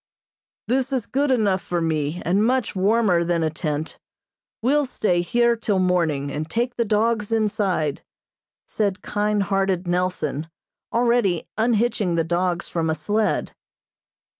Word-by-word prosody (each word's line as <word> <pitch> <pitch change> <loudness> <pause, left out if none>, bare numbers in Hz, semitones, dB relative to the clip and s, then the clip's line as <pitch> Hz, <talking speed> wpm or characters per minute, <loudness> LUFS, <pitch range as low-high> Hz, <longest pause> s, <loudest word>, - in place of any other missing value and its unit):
"This 260 +2 0
is 255 -5 -1
good 280 +2 0
enough 205 -7 +2
for 175 0 -2
me, 160 0 -1
and 195 +5 +2
much 250 -1 +1
warmer 195 -2 +3
than 170 -1 0
a 160 - 0
tent 155 -1 -4 0.6
we'll 285 +3 +2
stay 180 -8 0
here 235 +6 +2
till 215 -3 -1
morning, 165 -7 +1
and 155 +2 -4
take 240 +6 -1
the 235 - +1
dogs 215 0 +1
inside," 205 -9 0 0.7
said 200 -3 -1
kind 210 0 0
hearted 195 -2 0
Nelson, 175 -4 -1 0.4
already 235 -7 +1
unhitching 220 -4 +1
the 165 - +2
dogs 175 +1 -1
from 165 -1 -1
a 160 - +1
sled. 205 +8 -1
195 Hz, 140 wpm, -23 LUFS, 170-225 Hz, 0.7 s, warmer